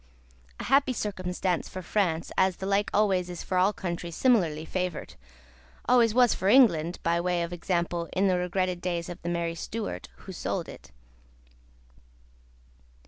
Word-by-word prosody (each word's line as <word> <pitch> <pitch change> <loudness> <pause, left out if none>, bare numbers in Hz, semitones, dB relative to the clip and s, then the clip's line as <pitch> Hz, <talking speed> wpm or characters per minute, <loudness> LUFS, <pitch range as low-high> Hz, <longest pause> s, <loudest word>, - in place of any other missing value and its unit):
A - - -4
happy 270 -1 +3
circumstance 185 -4 -2
for 185 - -7
France, 170 -5 -1
as 190 -1 +2
the 190 - -6
like 200 +1 +1
always 190 -4 +2
is 175 -1 -6
for 185 - 0
all 190 +3 +4
countries 170 -4 -5
similarly 170 - +2
favoured! 180 -2 -3 0.7
always 240 -2 +5
was 245 +1 +4
for 190 - -2
England 180 -8 +5
(by 170 +1 +1
way 175 -1 0
of 170 +1 -5
example), 170 -1 -2
in 195 +2 +2
the 185 - +3
regretted 180 0 -1
days 175 -1 -2
of 175 - -8
the 175 - -4
merry 170 -1 -1
Stuart 165 - -5
who - - -11
sold - - -3
it. - - -12
180 Hz, 155 wpm, -27 LUFS, 170-200 Hz, 0.7 s, always